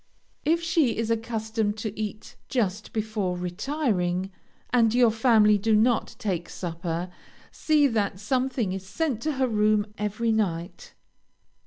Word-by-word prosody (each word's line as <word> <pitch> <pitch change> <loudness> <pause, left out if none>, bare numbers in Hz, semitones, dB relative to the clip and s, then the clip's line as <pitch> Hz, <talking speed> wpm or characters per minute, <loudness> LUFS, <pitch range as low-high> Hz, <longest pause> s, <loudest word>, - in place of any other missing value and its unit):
If 330 +3 +2
she 320 -9 +2
is 230 0 -1
accustomed 220 -2 -1
to 215 -1 -4
eat 215 0 -6
just 210 -5 -1
before 215 -4 -2
retiring, 185 - -1 0.4
and 235 -2 +3
your 245 -2 +5
family 220 -2 +4
do 220 +2 +2
not 230 +2 +2
take 180 -5 -3
supper, 170 0 -4 0.4
see 305 -2 +2
that 210 -7 0
something 250 -2 0
is 190 -1 -5
sent 265 0 -2
to 310 +3 -1
her 265 -1 +1
room 210 -1 +1
every 215 +2 0
night. 180 -5 -2
215 Hz, 135 wpm, -26 LUFS, 195-240 Hz, 0.4 s, your